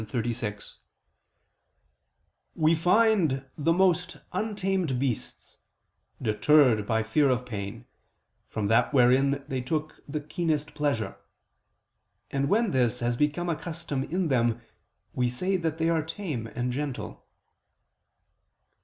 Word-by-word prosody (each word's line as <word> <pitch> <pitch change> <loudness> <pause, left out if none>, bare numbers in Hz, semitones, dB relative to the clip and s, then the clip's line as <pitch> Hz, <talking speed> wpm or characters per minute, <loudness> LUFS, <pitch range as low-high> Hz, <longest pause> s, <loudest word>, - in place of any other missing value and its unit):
36): 110 -2 -4 1.8
"We 155 +1 +3
find 175 -5 +3
the 160 +2 +1
most 180 0 +2 0.2
untamed 190 - -1
beasts, 125 -3 -3 0.6
deterred 115 -1 +4
by 110 -1 +1
fear 135 +6 +2
of 125 -1 0
pain, 105 0 -6 0.6
from 110 - -3
that 115 +7 +2
wherein 135 +2 +4
they 130 -3 -2
took 155 +4 -3
the 150 +1 -3
keenest 150 0 -2
pleasure; 145 -7 -1 1.1
and 140 +1 0
when 225 +1 +2
this 125 -2 +1
has 120 0 0
become 150 +6 0
a 170 - 0
custom 160 -4 -4
in 180 +1 -1
them, 120 -3 +2 0.5
we 125 -1 +1
say 180 +11 -1
that 165 -3 -1
they 165 0 +1
are 165 -1 +2
tame 155 - -4
and 125 +2 -3
gentle." 140 0 -5
140 Hz, 120 wpm, -27 LUFS, 120-165 Hz, 1.8 s, deterred